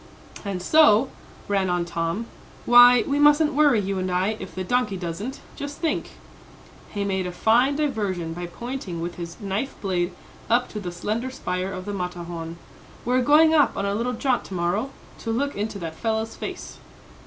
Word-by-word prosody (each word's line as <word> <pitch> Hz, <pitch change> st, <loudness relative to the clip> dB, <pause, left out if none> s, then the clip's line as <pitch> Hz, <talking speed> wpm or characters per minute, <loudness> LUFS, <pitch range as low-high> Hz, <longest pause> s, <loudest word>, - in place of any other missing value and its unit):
"And 195 Hz, -3 st, -4 dB
so," 275 Hz, -3 st, +5 dB, 0.4 s
ran 195 Hz, -2 st, +1 dB
on 175 Hz, -1 st, 0 dB
Tom, 170 Hz, +6 st, -2 dB, 0.4 s
"why, 245 Hz, 0 st, +8 dB
we 285 Hz, +1 st, 0 dB
mustn't 295 Hz, +1 st, +5 dB
worry, 290 Hz, -5 st, +4 dB
you 195 Hz, -1 st, -2 dB
and 185 Hz, 0 st, -2 dB
I, 180 Hz, +2 st, +1 dB
if -, -, -8 dB
the 185 Hz, -, -3 dB
donkey 210 Hz, -1 st, 0 dB
doesn't. 190 Hz, -, -5 dB
Just 285 Hz, 0 st, -6 dB
think," 325 Hz, -, -2 dB, 0.8 s
he 205 Hz, -1 st, -3 dB
made 190 Hz, -2 st, -1 dB
a -, -, -4 dB
fine 235 Hz, +9 st, +3 dB
diversion 205 Hz, -, -1 dB
by 175 Hz, +1 st, -5 dB
pointing 235 Hz, -3 st, -6 dB
with 170 Hz, +1 st, -5 dB
his 170 Hz, -1 st, -7 dB
knife 205 Hz, +6 st, -3 dB
blade 180 Hz, -2 st, -1 dB, 0.4 s
up 240 Hz, +2 st, +3 dB
to 210 Hz, -, -5 dB
the 180 Hz, -3 st, -5 dB
slender 215 Hz, +8 st, -3 dB
spire 185 Hz, -7 st, -3 dB
of 185 Hz, -1 st, -6 dB
the 205 Hz, -, -4 dB
Matterhorn 175 Hz, -3 st, -5 dB, 0.5 s
"we're 250 Hz, +2 st, +2 dB
going 310 Hz, +4 st, +5 dB
up 295 Hz, -3 st, +3 dB
on 200 Hz, -, -1 dB
a 200 Hz, -, 0 dB
little 235 Hz, +4 st, -1 dB
jaunt 250 Hz, +1 st, 0 dB
to 190 Hz, -, -7 dB
morrow, 180 Hz, +9 st, 0 dB, 0.3 s
to 230 Hz, -, -6 dB
look 280 Hz, +5 st, -1 dB
into 210 Hz, +1 st, -3 dB
that 165 Hz, -4 st, -5 dB
fellow's 220 Hz, +4 st, -2 dB
face." -, -, -7 dB
205 Hz, 180 wpm, -24 LUFS, 180-250 Hz, 0.8 s, why